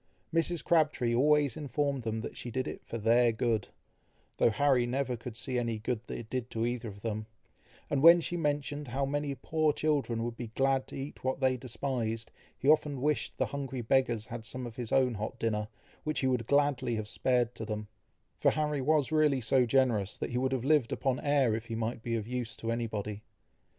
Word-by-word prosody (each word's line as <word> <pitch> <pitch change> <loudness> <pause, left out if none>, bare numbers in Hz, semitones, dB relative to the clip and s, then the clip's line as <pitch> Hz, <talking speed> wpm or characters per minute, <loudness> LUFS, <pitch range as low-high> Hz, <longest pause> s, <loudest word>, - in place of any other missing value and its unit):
Mrs. 165 0 +1
Crabtree 150 -8 +2
always 145 +1 +3
informed 140 -1 -1
them 110 -1 -2
that - - -6
she 120 - -6
did 130 +2 -2
it - - -6
"for 115 - -5
their 115 +2 +4
good," 110 -2 0 0.7
though - - +5
Harry 125 +1 +3
never 130 0 -1
could 115 0 -8
see 125 0 -2
any 115 -2 -1
good 115 +2 -2
that - - -5
it 115 - -8
did 125 0 -3
to 115 0 -1
either 120 -1 -2
of 100 -1 -9
them; 110 -1 -3 0.6
and 140 - 0
when 170 +3 +9
she 170 +1 -3
mentioned 145 -2 -1
how 135 +3 -1
many 145 0 -2
poor 155 +4 +1
children 145 -7 0
would 120 0 -3
be 120 0 -5
glad 135 0 +2
to - - -8
eat 140 +2 -7
what 130 +1 -1
they 130 -1 +3
despised, 120 -2 -3 0.3
he 135 - -3
often 150 -2 +4
wished 150 +3 0
the - - +2
hungry 135 -3 -4
beggars 120 -2 +1
had 115 0 -7
some 125 +3 -3
of 115 -2 -8
his 120 -4 -5
own 130 -2 +3
hot 110 +4 -4
dinner, 105 -2 -1 0.4
which 155 0 -1
he 130 - +2
would 125 -3 0
gladly 140 -4 +2
have 110 -1 -3
spared 125 +1 +1
to 110 - -7
them; 105 -1 -4 0.5
for - - +5
Harry 150 -2 0
was 150 0 +2
really 150 -3 +3
so 125 +1 +3
generous, 115 -6 +2
that - - -4
he 120 - -1
would 130 +1 0
have 130 -2 -1
lived 145 -5 +3
upon 135 -2 0
air, 140 -5 +2
if 110 +1 -3
he 115 - -4
might 115 +1 -2
be 115 0 -2
of 110 -1 -3
use 120 -2 -3
to 115 - -3
anybody. 105 -3 -3
125 Hz, 210 wpm, -31 LUFS, 115-140 Hz, 0.7 s, when